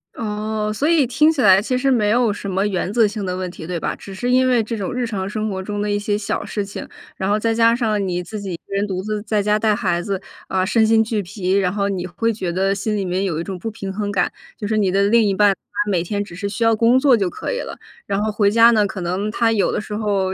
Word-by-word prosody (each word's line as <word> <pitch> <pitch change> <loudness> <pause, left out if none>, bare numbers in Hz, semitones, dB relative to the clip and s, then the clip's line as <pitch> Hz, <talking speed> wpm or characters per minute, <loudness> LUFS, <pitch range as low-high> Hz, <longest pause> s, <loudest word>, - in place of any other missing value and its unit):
哦， 215 -1 -2
所 280 +8 0
以 330 -5 +4
听 260 +6 +3
起 310 -4 0
来 195 -3 +6
其 250 +4 -1
实 270 +2 +1
没 215 -5 +2
有 235 -1 +3
什 200 0 -5
么 195 +2 0
原 190 -2 -1
则 230 -1 +4
性 210 -1 -3
的 180 -1 -2
问 185 -1 -4
题， 160 - -9
对 180 -1 -2
吧？ - - -2
只 195 -1 -10
是 245 +5 -1
因 255 0 +4
为 245 -3 +3
这 225 +2 -4
种 195 -3 -3
日 250 0 -1
常 195 -4 -3
生 215 +1 -2
活 190 -2 -3
中 205 +1 -4
的 210 - -1
一 205 - +1
些 205 0 -1
小 210 - -3
事 205 - -3
情， 200 - -7 0.3
然 190 - -2
后 210 - +3
再 225 +1 0
加 230 0 +4
上 215 -5 0
你 180 -1 -2
自 210 +4 -7
己 195 -3 -5
一 - - -2
个 165 - -12
人 200 +1 0
独 185 -1 -3
自 215 0 -3
在 215 -1 0
家 210 +1 +2
带 215 -1 +2
孩 175 -4 0
子， 195 0 -3 0.3
呃， 185 -1 0
身 220 +2 +3
心 225 0 +4
俱 220 -2 -1
疲， 185 0 -4
然 190 -1 +2
后 200 -1 0
你 185 -2 -3
会 230 +6 -1
觉 190 -5 -4
得 195 +2 +1
心 205 +2 -2
里 200 - -1
面 185 +1 -1
有 165 -4 -2
一 - - -4
种 185 0 -6
不 225 - -4
平 200 -3 -6
衡 205 +1 -3
感， 185 -3 0 0.3
就 210 - -5
是 215 +1 0
你 200 -3 +2
的 195 +2 +2
另 230 +4 +4
一 200 - +1
半 205 0 +4
他 205 +2 -4
每 180 -3 +2
天 205 +4 -2
只 200 - -12
是 200 +4 -4
需 205 +3 -2
要 225 0 +4
工 230 +3 +4
作 260 -2 +5
就 195 -4 0
可 - - -5
以 - - -2
了。 - - -6 0.3
然 200 +1 -1
后 215 - 0
回 205 -1 +2
家 230 +2 +6
呢， 210 -3 +3
可 190 - -6
能 185 +4 -2
他 230 0 +2
有 215 -3 +2
的 - - -1
时 210 - -8
候 200 -3 0
205 Hz, 320 characters per minute, -20 LUFS, 195-225 Hz, 0.3 s, 来